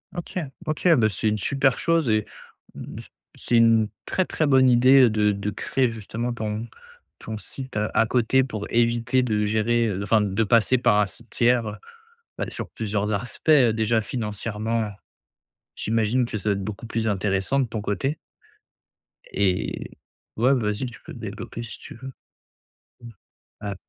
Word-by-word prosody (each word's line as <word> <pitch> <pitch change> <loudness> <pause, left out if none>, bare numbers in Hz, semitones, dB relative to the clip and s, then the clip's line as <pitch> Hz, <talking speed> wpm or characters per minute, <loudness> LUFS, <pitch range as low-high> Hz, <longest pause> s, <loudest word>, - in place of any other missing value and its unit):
OK 175 +1 -4 0.3
OK. 155 +3 -1
Bah, 110 -3 +4
c'est 105 +3 -2
une 105 - 0
super 135 +3 +1
chose 165 -5 +1
et 110 -1 +2 0.5
mmh, - - -8 0.4
c'est 120 - -1
une 115 -2 +4 0.2
très, 185 - 0
très 155 - -1
bonne 130 -2 +5
idée 125 +1 +6
de 105 -1 +2
de 100 +1 -3
créer, 130 +4 0
justement, 115 +2 -4
ton 110 0 -4 0.5
ton 110 -1 -6
site 130 +2 -7
à 105 +1 +1
à 115 - +4
côté 125 +3 +2
pour 110 -5 -5
éviter 120 +2 +2
de 105 -3 0
gérer, 115 +2 +1
heu, 100 -2 -2
enfin, 110 +1 +3
de 100 +2 0
passer 115 +4 +3
par 105 -4 +3
un 105 - +4
site 115 +4 -12
tiers, 120 -1 +2
heu 105 - -4 0.6
bah, - - -2
sur - - -6
plusieurs 105 -1 -2
aspects, 115 +9 -4
heu, 125 -7 +6
déjà 110 0 +1
financièrement, 110 0 -3 0.9
j'imagine 115 +3 +1
que 115 -2 -4
ça 100 - -9
doit - - +4
être 100 -1 -4
beaucoup 105 +3 -6
plus 115 0 -2
intéressant 100 +6 0
de 135 - +2
ton 110 -2 -4
côté. 105 - -2 1.1
Et 95 -2 -1 0.5
ouais, 125 +4 +4
vas-y, 105 +1 -1
tu 120 -3 -9
peux - - -10
développer, 115 - -7
si 115 - -9
tu - - -11
veux. 130 +3 -8 0.9
Mmh. 120 - -10 0.5
Ah 100 -1 -4
115 Hz, 170 wpm, -24 LUFS, 105-125 Hz, 1.1 s, idée